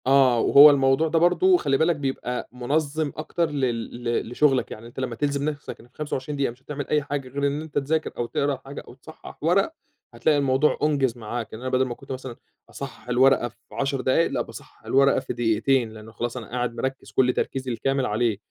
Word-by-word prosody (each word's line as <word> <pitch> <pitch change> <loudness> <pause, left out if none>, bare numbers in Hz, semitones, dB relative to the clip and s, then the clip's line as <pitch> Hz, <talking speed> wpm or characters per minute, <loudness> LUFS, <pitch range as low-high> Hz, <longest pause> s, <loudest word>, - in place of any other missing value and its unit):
آه، 130 -3 +5
وهو 145 +5 +9
الموضوع 135 +2 +3
ده 165 +1 +2
برضه 355 - +4
خلّي 135 - +1
بالك 165 +3 +2
بيبقى 135 -3 -3
منظِّم 145 +4 -1
أكتر 160 +1 -1
لل 120 -4 -2
ل 120 -1 -1
لشغلك، 135 0 +2
يعني 110 +2 -8
أنت 120 - -9
لمّا 130 -3 -3
تلزم 145 +2 0
نفسك 145 -1 -7
إنك 120 +1 -18
25 150 -1 -4
دقيقة، 140 -3 0
مش 120 +2 -18
هتعمل 145 -1 -5
أي 150 -1 +1
حاجة 140 -2 -4
غير 140 +2 -1
إن 145 +2 -2
أنت 160 -1 -6
تذاكر 155 +3 0
أو 120 - -1
تقرا 140 +2 -1
حاجة 140 +1 -7
أو - - -11
تصحّح 155 +5 -13
ورق، 195 - +2 0.4
هتلاقي 130 +6 +2
الموضوع 140 +1 +2
أُنجِز 135 -5 +1
معاك، 115 0 -5
يعني 110 +3 -9
أنا 130 - -3
بدل 130 +1 +3
ما 120 -2 -5
كنت - - -12
مثلًا 130 -2 -6 0.3
أصحّح 130 -4 -9
الورقة 125 0 +4
في 120 - -26 0.2
10 135 -1 -1
دقايق، 130 +7 +2
لأ - - 0
باصحّح - - -11
الورقة 140 +1 +4
في - - -5
دقيقتين، 115 +1 +1
لأنه 110 0 -11
خلاص 120 +2 -4
أنا 115 - -7
قاعد 120 -1 -2
مركّز 130 +3 -4
كل 125 -1 +3
تركيزي 130 -1 -2
الكامل 135 +3 0
عليه. 110 -1 0
135 Hz, 205 wpm, -24 LUFS, 120-145 Hz, 0.4 s, وهو